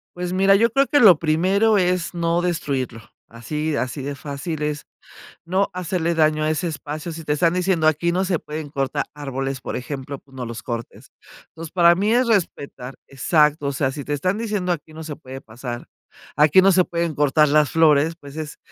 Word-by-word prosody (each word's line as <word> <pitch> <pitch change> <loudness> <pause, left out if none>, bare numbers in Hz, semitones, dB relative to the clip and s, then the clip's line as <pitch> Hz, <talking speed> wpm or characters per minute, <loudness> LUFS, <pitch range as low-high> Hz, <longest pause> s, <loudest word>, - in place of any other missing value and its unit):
Pues 180 0 -4
mira, 195 +1 +4
yo 230 +3 +3
creo 275 +3 +3
que 290 - +3
lo 185 -8 +8
primero 190 +7 +2
es 180 -2 0
no 170 0 0
destruirlo, 140 -9 -2 0.3
así 150 +7 -4
así 130 +2 -3
de 140 +1 -4
fácil 145 +2 -5
es, 150 -1 -3 0.6
no 190 +4 +1
hacerle 175 -2 -1
daño 155 -1 +2
a 155 - +1
ese 155 +3 -1
espacio, 155 +1 -6
si 165 +1 -7
te 150 -1 -1
están 165 +2 +2
diciendo: 180 -3 +1
"Aquí 160 +3 +2
no 185 +2 0
se 180 -3 0
pueden 150 -1 -7
cortar 135 -2 -2
árboles", 135 -2 -4
por - - -5
ejemplo, 135 +2 -6
pues, 135 0 -23
no 125 -2 -5
los 115 0 -7
cortes. 115 -1 -7 0.4
Entonces, 165 -1 -9
para 170 -1 +5
mí 205 +5 +1
es 250 +1 +3
respetar, 140 - -2
exacto, 150 +1 +2
o 140 - -1
sea, 135 -1 0
si 140 0 -7
te 145 - -1
están 185 +8 -1
diciendo: 205 -5 -1
"Aquí 155 -1 -7
no 160 0 -8
se 150 -2 -6
puede 130 +1 -10
pasar, 120 +2 -7 0.5
aquí 150 +5 +5
no 195 +1 +5
se 185 0 +4
pueden 170 -2 -2
cortar 150 +1 +3
las 150 0 +3
flores", 160 0 +4
pues, 140 -3 -12
es 155 -1 -6
155 Hz, 200 wpm, -22 LUFS, 140-180 Hz, 0.6 s, lo